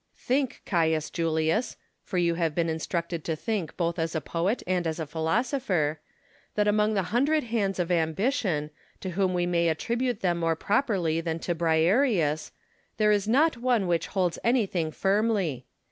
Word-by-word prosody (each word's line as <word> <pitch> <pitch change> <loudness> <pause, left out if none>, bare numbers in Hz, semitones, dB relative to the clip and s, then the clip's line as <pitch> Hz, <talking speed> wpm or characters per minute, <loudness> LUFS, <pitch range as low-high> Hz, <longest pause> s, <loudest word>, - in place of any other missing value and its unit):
Think, 260 0 -1
Caius 160 -3 +1
Julius 165 +7 0 0.2
(for 185 - -5
you 170 -1 +2
have 165 -3 -1
been 170 -1 +1
instructed 170 +1 -3
to 160 - -1
think 190 -2 -3
both 170 -1 -1
as 165 0 -2
a - - +1
poet 175 +9 -1
and 180 -2 0
as 160 +1 -3
a 160 - -2
philosopher), 160 - 0 0.6
that 210 0 +2
among 210 +1 +2
the 195 - +1
hundred 295 +6 +2
hands 215 -5 -1
of 180 -1 -1
Ambition, 165 - 0 0.3
to 185 - -4
whom 185 0 0
we 175 0 +1
may 170 -1 +2
attribute 235 +7 -1
them 175 -2 +1
more 165 -1 +1
properly 190 - 0
than 165 -1 -2
to 175 - -1
Briareus, 165 - +2 0.5
there 210 -1 +4
is 205 -1 +1
not 280 +5 +3
one 240 -4 +1
which 170 -2 0
holds 180 -3 -1
anything 195 -10 +1
firmly. 195 - 0
180 Hz, 165 wpm, -27 LUFS, 165-215 Hz, 0.6 s, there